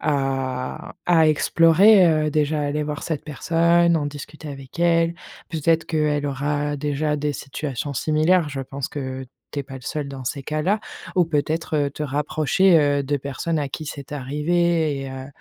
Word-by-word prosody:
à 135 -3 -2
à 165 -3 +5
explorer, 170 +6 +5
heu, 155 -2 +2
déjà 150 0 +1
aller 150 +1 -1
voir 150 -1 -4
cette 160 -4 -3
personne, 170 +3 +2
en 145 -2 -1
discuter 150 +2 -8
avec 135 +1 -10
elle. 170 0 +3 0.3
Peut-être 165 0 +1
qu'elle 150 -2 0
aura 145 +1 -1
déjà 150 +1 -1
des 150 0 -1
situations 140 -1 -5
similaires, 155 +4 +2
je 140 -2 -4
pense 135 0 -5
que 130 -2 -5 0.2
tu - - -5
es - - -5
pas 135 0 -10
le 130 - -8
seul 145 +2 -4
dans 135 -2 -7
ces 140 +3 -3
cas-là 155 +9 0 0.4
ou 180 - +5
peut-être, 160 +1 -1
heu, 145 -1 +1
te 150 - -6
rapprocher, 155 +5 +3
heu, 145 -1 +2
de 145 +1 -1
personnes 140 +4 -3
à 145 -2 -2
qui 155 - -6
c'est 140 -1 -7
arrivé 150 +2 0
et 135 - -6
heu 130 0 -7
150 Hz, 175 wpm, -22 LUFS, 140-160 Hz, 0.4 s, à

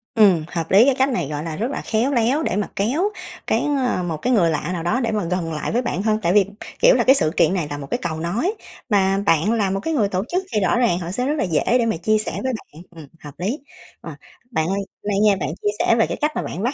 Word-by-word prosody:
Ừ, 195 -8 +5
hợp 165 -1 -4
lý, 205 +6 +7
cái 275 -2 +3
cách 265 +1 +2
này, 180 - -1
gọi 150 0 -4
là, 160 -1 -4
rất 235 - -2
là - - -4
khéo 235 +5 0
léo 250 +6 +2
để - - -1
mà 205 0 -1
kéo 285 - 0 0.4
cái - - +1 0.3
ờ, 180 - -1
một 165 -3 -3
cái 250 +10 0
người 175 -7 +4
lạ 150 +1 -2
nào 165 -2 -4
đó 215 +9 +1
để 235 -3 -1
mà 210 -3 -1
gần 170 -1 -2
lại 150 - -3
với 240 - +1
bạn 240 -6 -2
hơn, 215 0 +1
tại 175 +1 +1
vì, 205 -3 +5 0.3
kiểu - - +6
là, - - +2
cái 265 - +6
sự 155 - +2
kiện - - +4
này 175 -6 -1
tà 145 - -4
một 140 -1 -7
cái - - +1
cầu 160 -2 -3
nối, 220 - -1 0.4
mà 195 -2 +2
bạn 180 +4 +3
là 210 -4 +1
một 195 - -1
cái 325 +11 -3
người 220 -9 +2
tổ 185 +1 -1
chức 365 +2 -1
thì 210 - +2
rõ 180 +4 +2
ràng 225 -8 +2
họ 175 0 -5
sẽ 250 +6 -2
rất 290 - 0
là - - 0
dễ 165 -5 0
để 235 - +1
mà 220 -7 0
chia 215 +6 +1
sẻ 215 - -2
với 260 0 -1
bạn, 165 -8 -9
ừm, 155 -3 -11 0.2
hợp 145 -2 -9
lý. 215 - -2 0.4
Ờ, - - -8 0.4
bạn 160 -8 0
ơi, 195 +2 -1
hôm 200 +1 -7
nay 200 0 +1
nghe 205 -2 +5
bạn - - -3
chia 205 - +1
sẻ 230 - +3
về 225 - +2
cái - - -4
cách 300 - +2
mà - - -1
bạn 185 - -5
bắt 250 +5 0
200 Hz, 300 wpm, -21 LUFS, 170-240 Hz, 0.4 s, lý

